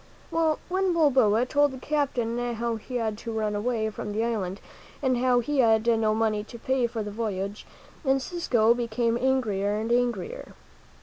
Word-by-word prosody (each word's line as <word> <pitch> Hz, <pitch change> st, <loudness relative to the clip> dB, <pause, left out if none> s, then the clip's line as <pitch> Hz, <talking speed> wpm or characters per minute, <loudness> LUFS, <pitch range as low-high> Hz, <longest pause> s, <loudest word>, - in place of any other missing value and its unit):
Well, 320 Hz, -2 st, +2 dB
when 375 Hz, 0 st, +1 dB
Balboa 255 Hz, -8 st, +4 dB
told 290 Hz, +3 st, +3 dB
the -, -, -7 dB
captain 245 Hz, -5 st, -1 dB
how 230 Hz, 0 st, -2 dB
he 250 Hz, +3 st, -8 dB
had 220 Hz, -3 st, -1 dB
to 230 Hz, -, -5 dB
run 215 Hz, -1 st, -1 dB
away 220 Hz, +1 st, -1 dB
from 210 Hz, 0 st, -5 dB
the 220 Hz, +2 st, 0 dB
island, 205 Hz, -5 st, -2 dB, 0.4 s
and 255 Hz, -3 st, +1 dB
how 250 Hz, -1 st, +3 dB
he 285 Hz, +4 st, -1 dB
had 225 Hz, -2 st, +4 dB
no 225 Hz, -2 st, +2 dB
money 215 Hz, -2 st, 0 dB
to 235 Hz, -, -11 dB
pay 260 Hz, 0 st, 0 dB
for 225 Hz, -2 st, -4 dB
the 205 Hz, -, -6 dB
voyage, 205 Hz, -2 st, -4 dB, 0.4 s
Encisco 265 Hz, -4 st, +2 dB
became 235 Hz, -1 st, 0 dB
angrier 225 Hz, -6 st, +1 dB
and 225 Hz, +2 st, -2 dB
angrier. 240 Hz, -6 st, -1 dB
235 Hz, 170 wpm, -26 LUFS, 220-260 Hz, 0.4 s, Balboa